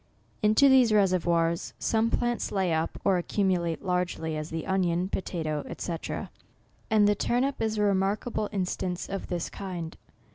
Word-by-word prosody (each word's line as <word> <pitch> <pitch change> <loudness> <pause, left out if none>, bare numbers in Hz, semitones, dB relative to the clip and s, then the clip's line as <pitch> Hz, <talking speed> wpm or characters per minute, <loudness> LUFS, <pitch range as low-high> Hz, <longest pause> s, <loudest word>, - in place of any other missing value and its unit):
Into 215 +6 +5
these 260 -4 +6
reservoirs, 170 -4 +2
some 225 0 +1
plants 240 +1 -1
lay 190 -4 +1
up 160 +1 -1
or 190 -2 +4
accumulate 175 -3 0
largely, 180 -3 -1
as 155 +1 -4
the 160 -1 -4
onion, 185 -1 +1
potatoe, 155 -6 -3 0.2
&c. 170 - -2 0.9
And 210 -2 +5
the 205 - +4
turnip 250 +6 0
is 220 -1 0
a 210 - +2
remarkable 205 +2 0
instance 185 -2 -2
of 195 0 -5
this 175 -2 -2
kind. 175 -4 -6
190 Hz, 145 wpm, -28 LUFS, 170-210 Hz, 0.9 s, these